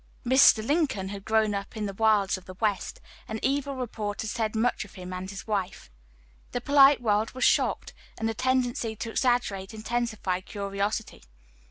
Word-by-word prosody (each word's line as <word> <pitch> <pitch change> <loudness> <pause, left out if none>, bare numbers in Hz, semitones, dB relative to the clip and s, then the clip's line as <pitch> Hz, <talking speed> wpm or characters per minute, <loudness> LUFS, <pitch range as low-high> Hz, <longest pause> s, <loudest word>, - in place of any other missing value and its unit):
Mr. 240 -3 +6
Lincoln 280 - 0
had 200 -1 -7
grown 220 -1 +2
up 200 +2 -5
in 215 - -2
the 200 - -4
wilds 210 -2 +3
of 185 -1 -10
the 185 - -10
West, 205 -1 -2 0.3
and 220 0 -4
evil 280 0 0
report 220 -5 -4
had 220 - -3
said 220 -1 -2
much 235 +3 +1
of 210 - -15
him 185 0 -7
and 185 +1 -5
his 195 0 -8
wife. 195 - -3 0.6
The 245 - 0
polite 275 +1 +6
world 215 0 +1
was 255 - -2
shocked, - - +2 0.2
and 225 - -1
the 225 - -1
tendency 245 -2 0
to 225 +1 -5
exaggerate 225 -5 0
intensified 220 -5 -2
curiosity. 200 +2 -3
220 Hz, 175 wpm, -27 LUFS, 200-240 Hz, 0.6 s, Mr